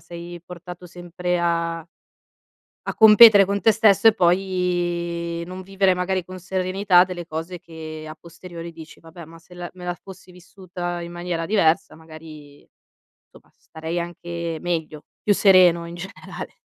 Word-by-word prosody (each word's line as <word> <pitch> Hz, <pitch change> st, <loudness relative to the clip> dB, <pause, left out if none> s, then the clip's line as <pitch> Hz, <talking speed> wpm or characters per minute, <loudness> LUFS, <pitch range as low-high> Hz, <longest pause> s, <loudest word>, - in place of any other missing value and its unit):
sei 175 Hz, 0 st, -10 dB
portato 180 Hz, 0 st, -11 dB
sempre 175 Hz, 0 st, -4 dB
a 170 Hz, -1 st, -1 dB, 1.0 s
a -, -, -4 dB
competere 215 Hz, -2 st, +8 dB
con 200 Hz, +1 st, -2 dB
te 225 Hz, -, +5 dB
stesso 215 Hz, 0 st, +4 dB
e 220 Hz, -, +7 dB
poi 175 Hz, -2 st, -1 dB
non 185 Hz, +1 st, -8 dB
vivere 195 Hz, 0 st, +1 dB
magari 180 Hz, 0 st, -2 dB
con 185 Hz, +1 st, -10 dB
serenità 185 Hz, 0 st, +2 dB
delle 175 Hz, -2 st, -7 dB
cose 165 Hz, +2 st, -6 dB
che 155 Hz, -2 st, -9 dB
a 155 Hz, -, -9 dB
posteriori 170 Hz, 0 st, -10 dB
dici: 160 Hz, -1 st, -13 dB
"Vabbè, 165 Hz, +1 st, -13 dB
ma 165 Hz, +1 st, -14 dB
se 165 Hz, +2 st, -18 dB
la 175 Hz, 0 st, -7 dB
me 180 Hz, -1 st, -10 dB
la 175 Hz, -, -2 dB
fossi 185 Hz, 0 st, -14 dB
vissuta 180 Hz, -1 st, -7 dB
in 170 Hz, 0 st, -8 dB
maniera 175 Hz, -1 st, -4 dB
diversa, 170 Hz, -4 st, +1 dB
magari, 155 Hz, -2 st, -14 dB, 0.6 s
somma -, -, -20 dB
starei 160 Hz, +2 st, -6 dB
anche 170 Hz, -1 st, -5 dB
meglio, 160 Hz, -3 st, -4 dB, 0.2 s
più 205 Hz, -, +3 dB
sereno 180 Hz, -4 st, +5 dB
in 170 Hz, -, -9 dB
generale." 185 Hz, +3 st, -9 dB
175 Hz, 150 wpm, -22 LUFS, 170-185 Hz, 1.0 s, competere